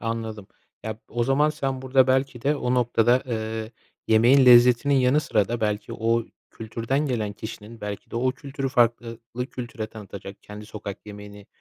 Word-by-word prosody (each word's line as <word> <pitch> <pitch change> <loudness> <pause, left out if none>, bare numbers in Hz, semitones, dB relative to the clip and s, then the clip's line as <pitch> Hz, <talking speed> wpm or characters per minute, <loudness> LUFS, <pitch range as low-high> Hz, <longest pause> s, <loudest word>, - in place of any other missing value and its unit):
Anladım. 110 -3 -4 0.4
Ya 110 -1 -4
b - - -24
o 120 0 -1
zaman 145 +4 +3
sen 135 -3 -3
burada 130 0 +4
belki 130 -2 0
de 145 +2 +1
o 125 -2 -1
noktada, 120 0 +3
eee, 110 -1 -4 0.4
yemeğin 120 +5 +6
lezzetinin 125 +3 +6
yanı 130 +3 +3
sıra 105 -8 +1
da 120 0 -3
belki 105 +1 -2
o 115 0 0 0.3
kültürden 115 +6 -2
gelen 110 -5 -2
kişinin 110 +1 -9
belki 105 -1 -6
de - - -5
o 130 +2 +1
kültürü 135 0 -5
fark 120 -3 +3
eee, 115 -1 -8 0.2
lı 125 +1 -2
kültüre 120 -3 -6
tanıtacak, 100 -2 -10
kendi 105 0 -10
sokak 105 -1 -8
yemeğini 105 0 -11
115 Hz, 175 wpm, -24 LUFS, 110-130 Hz, 0.4 s, yemeğin